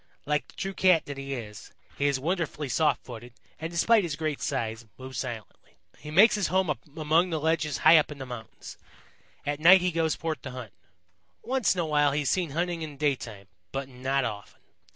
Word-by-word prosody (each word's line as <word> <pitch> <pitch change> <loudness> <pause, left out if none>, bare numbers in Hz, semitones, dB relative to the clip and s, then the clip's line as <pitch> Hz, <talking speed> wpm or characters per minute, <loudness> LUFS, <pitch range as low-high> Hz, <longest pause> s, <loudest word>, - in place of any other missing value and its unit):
Like 150 0 0
the - - -19
true 195 0 -4
Cat 185 -4 +4
that 140 -1 -7
he 135 0 -4
is, 105 -4 -9 0.2
he 140 - +1
is 140 -2 +1
wonderfully 160 -1 -2
soft 150 -2 +1
footed 120 -1 -10 0.3
and, 160 - -4
despite 210 +7 +4
his 170 -6 -3
great 155 -1 -3
size, 115 -4 -3
moves 130 0 -7
silently. 120 -5 -7 0.2
He 150 - -9
makes 195 +9 +6
his 205 -4 0
home 180 -3 +1 0.2
among 160 +3 +2
the 160 -2 -1
ledges 155 -3 0
high 160 +1 +9
up 155 - +2
in 150 - -7
the 135 - -6
mountains. 120 -3 -9 0.7
At 145 0 -2
night 180 +4 +8
he 180 0 +1
goes 160 -1 0
forth 160 -2 -4
to 130 - -7
hunt. 125 -5 -8 0.7
Once 255 -5 +1
in 180 - 0
a - - -1
while 145 -2 +2
he 150 +1 0
is 140 - +1
seen 180 -4 0
hunting 170 +3 -2
in 150 -3 -6
daytime, 125 -9 -2 0.3
but 135 0 -4
not 130 +1 -1
often. 105 -1 -7
150 Hz, 205 wpm, -27 LUFS, 130-165 Hz, 0.7 s, high